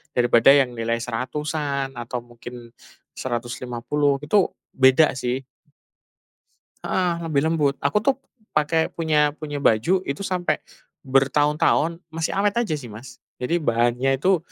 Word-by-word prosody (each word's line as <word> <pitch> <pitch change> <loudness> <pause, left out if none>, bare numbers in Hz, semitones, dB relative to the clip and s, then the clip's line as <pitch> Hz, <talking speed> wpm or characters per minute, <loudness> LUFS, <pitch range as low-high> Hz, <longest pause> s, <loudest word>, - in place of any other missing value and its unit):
Daripada 120 +1 +5
yang 135 -3 +3
nilai 115 +1 -1
Rp100.000-an 140 +3 -3
atau 120 +1 -4
mungkin 120 0 -11 0.5
Rp150.000, 125 +3 -2
itu 190 +5 +3 0.3
beda 130 +4 +5
sih. 125 0 -2 1.4
Heeh, 180 -2 +1
lebih 150 -4 +1
lembut. 150 -4 +1
Aku 140 +9 +2
tuh 265 +6 +2 0.4
pakai, 160 +2 +2
punya 150 -3 +2
punya 150 -2 -6
baju 140 - +3
itu 140 +7 -3
sampai 180 -5 -1 0.4
bertahun-tahun 145 +4 +2
masih 160 0 -2
awet 205 0 +2
aja 175 -10 -2
sih 135 - -9
Mas. 120 +3 -11 0.2
Jadi 165 +8 +1
bahannya 120 -1 +1
itu, 185 +6 +3
140 Hz, 125 wpm, -23 LUFS, 125-155 Hz, 1.4 s, Daripada